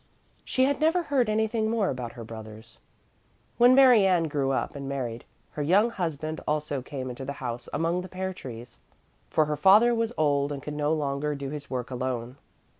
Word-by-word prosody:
She 260 - +1
had 280 +1 +1
never 325 +3 +3
heard 270 -7 +1
anything 220 +1 0
more 220 -4 +1
about 125 -3 -5
her 115 - -8
brothers. 110 -1 -10 0.8
When 245 +2 +7
Mary 250 -7 +7
Ann 180 -3 +3
grew 145 -4 -1
up 135 - -2
and 140 -1 -5
married, 120 -4 -4 0.3
her 150 - -5
young 195 +10 +3
husband 160 -5 -3
also 150 -2 -1
came 130 0 -6
into 125 +2 -7
the 140 +2 -4
house 120 -3 -6
among 165 +4 0
the 185 - -9
pear 190 +1 -4
trees, 120 -6 -10 0.5
for 155 - +2
her 150 0 -2
father 210 +8 +6
was 230 0 0
old 145 -2 +1
and 140 -1 -5
could 150 - -5
no 150 0 0
longer 145 -1 -1
do 140 -1 -5
his 145 -2 -7
work 125 -1 -4
alone. 125 0 -3
150 Hz, 190 wpm, -27 LUFS, 130-200 Hz, 0.8 s, When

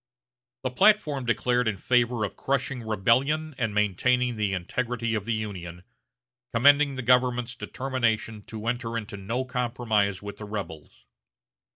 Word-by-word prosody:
The 130 - -1
platform 150 -4 +3
declared 120 +2 +1
in 110 -3 0
favor 120 0 +2
of 100 - -7
crushing 135 -1 -1
rebellion 130 +9 +1
and 115 -3 0
maintaining 120 +5 +1
the 105 -2 0
integrity 115 +5 -2
of 105 -3 -2
the 115 - 0
Union, 90 -5 -6 0.7
commending 140 +3 +5
the 130 - -4
government's 125 0 +2
determination 120 -4 -2
to 110 -1 -7
enter 120 -1 -2
into 105 -2 -6
no 115 +7 -3
compromise 115 -6 0
with 100 0 -8
the 105 - -7
rebels. 80 - -7
115 Hz, 140 wpm, -26 LUFS, 105-125 Hz, 0.7 s, commending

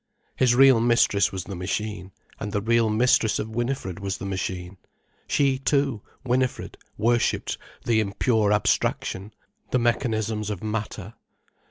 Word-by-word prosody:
His 125 -2 +3
real 135 -2 +7
mistress 115 -3 +3
was 95 -1 -4
the 100 - -7
machine, 95 +1 -4 0.3
and 105 - -4
the 105 - 0
real 115 0 +3
mistress 110 0 +3
of 110 +1 -4
Winifred 120 -5 -3
was 100 -1 -3
the 100 - -7
machine. 95 -1 -4 0.5
She 135 -2 +2
too, 135 -5 +1 0.2
Winifred, 130 0 -1 0.2
worshipped 120 +2 +1 0.3
the 115 -2 +3
impure 110 +1 +1
abstraction, 105 -1 0 0.4
the - - +1
mechanisms 110 -3 0
of 105 -3 -5
matter. 105 -1 -4
110 Hz, 135 wpm, -25 LUFS, 100-120 Hz, 0.5 s, real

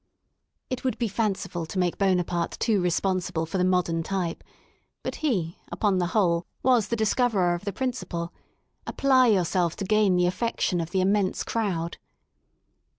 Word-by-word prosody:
It 255 - -3
would 260 - -1
be 235 - 0
fanciful 195 -5 -2
to 190 - -6
make 180 -2 0
Buonaparte 180 -3 0
too 215 -5 +2
respons 180 +1 0
ible 165 -2 -2
for 185 +3 -2
the - - +3
Modern 180 -2 +1
Type; 175 -1 -3 0.6
but - - -4
he, 185 - -1
upon 190 +2 +1
the 175 - +1
whole, 170 -4 +2 0.2
was 245 -4 +4
the 235 - -1
discoverer 220 -4 +2
of 175 +4 -5
the 200 - -1
principle: 185 -8 -3 0.5
apply 260 -2 +4
yourself 180 -4 +2
to 200 - -4
gain 210 -2 +3
the 180 0 +3
affection 185 -1 0
of 165 - -4
the 185 +1 +1
immense 195 0 +1
crowd. 180 -7 -2
185 Hz, 160 wpm, -26 LUFS, 175-215 Hz, 0.6 s, was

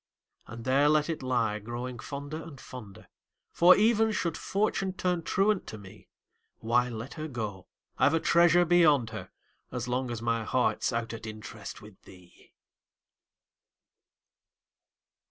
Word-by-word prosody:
And 115 +1 -9
there 140 +3 +4
let 150 +1 +2
it 160 - -5
lie, 125 -5 0
growing 120 +3 -6
fonder 145 +5 -6
and, 160 -5 -11
fonder 110 -7 -11 0.4
For, 180 +2 +7
even 220 +1 +3
should 170 -5 -1
Fortune 195 -2 -1
turn 180 -2 -1
truant 195 +4 +1
to 110 - -7
me, 100 -2 -14 0.5
Why, 120 +2 +1
let 115 +2 -7
her 155 0 -5
go 110 -8 -5 0.3
I've 145 - +4
a - - +2
treasure 170 +1 +4
beyond 155 -9 +4
her, 110 - -7 0.4
As 125 -1 -4
long 125 +1 -1
as 120 -2 -4
my 115 0 -1
heart's 125 +4 0
out 115 -1 -3
at 115 -1 -7
interest 110 -1 -9
With 105 -2 -15
thee! 90 -2 -18
130 Hz, 140 wpm, -29 LUFS, 115-165 Hz, 0.5 s, For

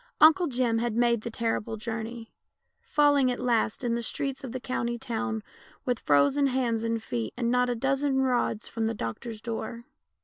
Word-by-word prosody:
Uncle 325 +3 +7
Jim 245 -4 +1
had 235 -1 -1
m.ade 235 -1 +3
the 235 - -4
terrible 225 -1 -2
journey, 225 +1 -5 0.5
falling 290 -3 +3
at 245 - -2
last 230 -1 +1
in 240 -1 +1
the 235 - 0
streets 275 +3 -3
of 260 - -5
the 255 - -4
country 240 -2 -2
town 230 -2 -3 0.4
with 245 -2 0
frozen 145 - +3
hands 245 -4 0
and 230 -1 -1
feet, 115 - -3
not 250 +1 +2
a 245 - 0
dozen 270 +2 +1
rods 245 -4 0
from 225 -1 -2
the 225 - -2
doctor's 210 - -5
door. 230 +1 -5
235 Hz, 175 wpm, -28 LUFS, 225-255 Hz, 0.5 s, Uncle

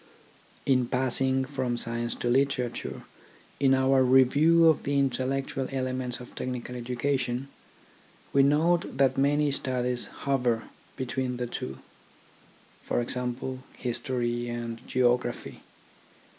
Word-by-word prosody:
In 130 -3 +3
passing 130 +1 +1
from 130 -3 -2
science 120 0 -2
to - - -3
literature, 125 -1 0 0.6
in 135 -1 +4
our 130 0 +4
review 145 +6 +5
of 160 -3 +4
the 140 0 0
intellectual 135 0 0
elements 130 -1 -2
of 125 - -11
technical 125 -1 -5
education, 125 +1 -2 0.8
we 140 - +6
note 155 +3 +2
that 135 -1 +3
many 145 +2 +2
studies 125 -2 -1
hover 125 -5 0 0.3
between 130 -1 -2
the 125 - -2
two: 65 - -5 1.0
for - - -1
example, 125 +1 -2 0.2
history 120 -1 -2
and 120 -1 -4
geography. 125 -1 0
130 Hz, 110 wpm, -28 LUFS, 120-135 Hz, 1.0 s, we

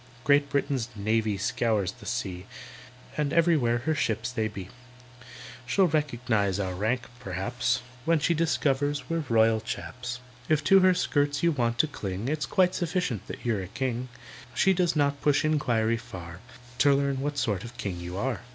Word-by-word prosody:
"Great 140 +1 +4
Britain's 140 -4 -1
navy 110 0 0
scours 105 -1 0
the - - -13
sea, 100 -7 -3 0.7
And 150 -2 0
everywhere 155 -9 +3
her 160 - +2
ships 115 -4 -1
they 110 -3 -1
be; 100 -3 -8 1.0
She'll 195 +8 +4
recognise 120 - 0
our 95 -2 -2
rank, 110 +7 0 0.2
perhaps, 120 +6 -1 0.2
When 165 +3 +3
she 155 +3 +2
discovers 145 -3 0
we're 165 -2 -1
Royal 110 -1 +4
Chaps. 120 +2 -5 0.3
"If 155 -1 +3
to 195 +5 +6
her 185 -1 +5
skirts 145 -4 0
you 170 - +4
want 120 -5 0
to 155 - +4
cling, 100 -3 -4
It's 150 0 -1
quite 185 -1 +3
sufficient 175 - -2
that - - -8
you're 110 -5 +1
a 90 - -6
king; 125 +2 -3 0.5
She 190 - +4
does 175 -2 +1
not 140 -1 +1
push 145 0 +3
inquiry 115 -7 +1
far 90 -8 -9 0.4
To 140 0 +5
learn 140 -1 0
what 145 +1 -2
sort 105 -8 0
of 120 +1 -10
king 100 -7 -4
you 90 +1 -6
are." 130 +4 -2
125 Hz, 170 wpm, -27 LUFS, 110-145 Hz, 1.0 s, to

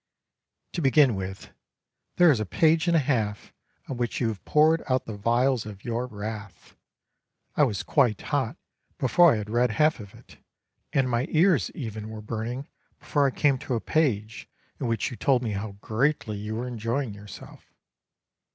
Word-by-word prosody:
To 175 - -2
begin 135 -2 +5
with, 95 0 -6 0.6
there 175 -2 +6
is 125 - +1
a 110 - -1
page 160 - +3
and 170 -1 +4
a - - +5
half 110 -7 -1 0.3
on 135 - -5
which 120 -1 -2
you 120 - +1
have 105 -3 -6
poured 155 +2 +4
out 130 0 +1
the 110 - -6
vials 120 +3 +1
of 105 -2 -10
your 120 +1 -2
wrath. 105 -3 -8 0.8
I 150 - +5
was 105 -7 -2
quite 125 -8 +2
hot - - -2 0.4
before 170 +6 +5
I 115 - +1
had 105 0 -5
read 120 +2 +2
half 155 +5 +2
of 100 -2 -11
it, - - -17 0.5
and 135 -2 +2
my 125 +3 0
ears 165 -1 +3
even 110 -5 -6
were 110 -1 -7
burning 115 +5 -4 0.3
before 145 -2 +1
I - - +2
came 135 0 +1
to 135 -3 -3
a - - 0
page 110 -8 -1 0.3
in 125 - -2
which 115 0 -1
you 120 - -7
told 130 -3 +2
me 110 - -2
how 100 +1 -4
greatly 115 -1 0
you 105 +2 -5
were 120 +2 -3
enjoying 120 +1 -2
yourself. 100 -1 -12
120 Hz, 180 wpm, -26 LUFS, 110-140 Hz, 0.8 s, there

